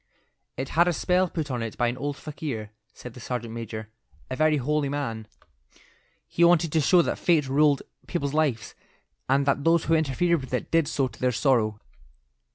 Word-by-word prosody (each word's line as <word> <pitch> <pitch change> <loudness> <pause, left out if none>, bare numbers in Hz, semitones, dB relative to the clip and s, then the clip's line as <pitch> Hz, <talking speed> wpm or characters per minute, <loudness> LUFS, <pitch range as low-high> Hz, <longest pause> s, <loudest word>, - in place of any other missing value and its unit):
"It 130 +1 -4
had 170 +2 +3
a 175 - +2
spell 180 +3 +1
put 155 -4 -4
on 125 -2 -2
it 115 -2 -5
by 120 - +2
an 120 - -1
old 140 +2 -4
fakir," 140 -9 -6 0.2
said 125 -1 -11
the 125 - -11
sergeant 120 -1 -5
major, 110 -2 -6 0.4
"a - - -1
very 155 +1 +3
holy 145 +1 0
man. 115 -7 -4 1.0
He 170 - +1
wanted 170 -2 +4
to 160 - +2
show 175 +4 +5
that - - -2
fate 160 -6 +2
ruled 145 +1 +3 0.2
people's 145 -6 -2
lives, 145 -9 0 0.6
and 135 +1 +3
that 140 0 +1
those 165 +1 +3
who 165 - 0
interfered 160 +2 +1
with 130 -1 -4
it - - -4
did 165 -3 +3
so 140 -3 0
to - - -15
their 125 0 +1
sorrow. 110 -4 +1
140 Hz, 190 wpm, -26 LUFS, 125-155 Hz, 1.0 s, show